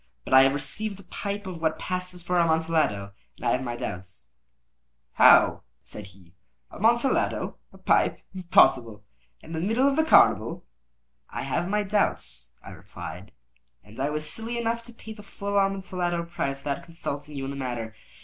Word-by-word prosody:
But - - -3
I 130 - +9
have 135 +1 +4
received 200 +8 -4
a - - -11
pipe 200 +3 -5
of 180 -3 -7
what 160 -1 0
passes 180 -1 -4
for 180 0 +1
Amontillado, 160 -12 +1 0.3
and - - -9
I - - +3
have 125 - +1
my 120 -2 -4
doubts." 90 - -7 0.8
"How?" - - +6 0.2
said 105 -2 -10
he. 95 -2 -19 0.4
"Amontillado? 235 +5 +1
A - - -16
pipe? - - +2
Impossible! 125 - +3 0.4
And 165 - -7
in 160 - -2
the 185 - -1
middle 245 +5 +3
of 280 - +2
the 315 - +3
carnival!" 315 - +4 0.6
"I - - -5
have 175 +2 -2
my 210 +1 +1
doubts," 65 - -1
I - - -10
replied; 90 +5 -9 0.5
"and 105 +4 -15
I 140 +2 0
was 150 0 -3
silly 225 +7 -4
enough 230 0 -1
to 240 - -12
pay 220 -1 -10
the 215 - -12
full 200 0 -2
Amontillado 185 -3 -1
price 140 -5 -4
without 140 0 -3
consulting 150 -3 -6
you 135 - -4
in 135 - -4
the - - -6
matter. 120 -5 -4
165 Hz, 175 wpm, -26 LUFS, 130-200 Hz, 0.8 s, I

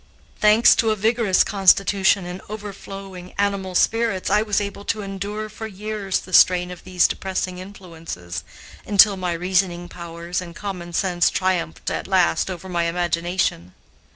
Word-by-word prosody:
Thanks 215 +2 +6
to 225 - +2
a 215 - +2
vigorous 220 -2 +2
constitution 195 -1 +3
and 180 +1 -7
overflowing 195 -3 -8
animal 200 -2 -1
spirits, 225 -3 +1
I 210 +1 +4
was 210 -2 0
able 200 0 -5
to 215 -2 -2
endure 200 +2 -5
for 215 +1 -7
years 210 -1 -3
the 185 - -13
strain 180 0 +5
of 180 - -10
these 180 -1 +2
depressing 185 -1 -3
influences, 165 - -8 0.4
until 205 0 +5
my 180 -2 -2
reasoning 175 0 0
powers 170 +1 -5
and 170 -2 -10
common 180 -4 -6
sense 175 -1 +2
triumphed 185 - -1
at - - -4
last 80 - +2
over 185 0 -7
my 170 -2 -1
imagination. 170 - -1
190 Hz, 150 wpm, -22 LUFS, 175-200 Hz, 0.4 s, Thanks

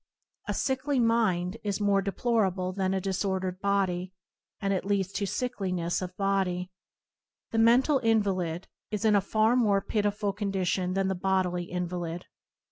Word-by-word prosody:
A - - -1
sickly 265 +1 0
mind 220 -5 +2
is 205 -1 -1
more 200 -1 +3
deplorable 195 -2 0
than 190 -1 0
a - - +1
disordered 190 -1 -2
body, 190 -2 0 0.5
and 195 -1 0
it 190 - -1
leads 195 -1 0
to 200 - -1
sickliness 185 -9 -2
of 180 0 -6
body. 190 -2 0 0.8
The 225 - +1
mental 250 +5 +5
invalid 195 -7 0 0.2
is 210 +1 -2
in 215 -1 +5
a 200 - +4
far 215 +4 +2
more 210 -5 +3
pitiable 205 0 -1
condition 190 -2 -1
than 195 0 +1
the 190 - +1
bodily 180 -1 0
invalid. 175 -1 -4
195 Hz, 145 wpm, -28 LUFS, 185-210 Hz, 0.8 s, mental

